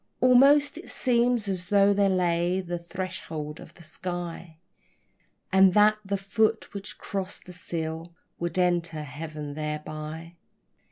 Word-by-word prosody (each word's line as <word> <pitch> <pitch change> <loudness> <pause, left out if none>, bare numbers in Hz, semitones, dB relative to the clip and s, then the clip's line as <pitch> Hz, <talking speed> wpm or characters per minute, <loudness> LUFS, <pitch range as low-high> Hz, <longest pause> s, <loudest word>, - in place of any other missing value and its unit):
Almost 275 +4 +5
it - - -9
seems 240 -3 +2
as 185 -2 -3
though 200 0 +5
there 200 0 +3
lay 175 0 +1
the 175 -2 -4
threshold 165 -4 -5
of 165 - -13
the 170 - -14
sky, 175 0 -6 1.0
And 190 -1 +6
that 215 0 +5
the 200 0 -1
foot 215 +3 0
which 200 0 -7
crossed 195 -1 -5
that 180 - -10
sill 165 -1 -5 0.2
would 170 0 -2
enter 170 -3 +1
Heaven 150 0 -7
thereby. 155 +2 -6
180 Hz, 130 wpm, -27 LUFS, 160-200 Hz, 1.0 s, And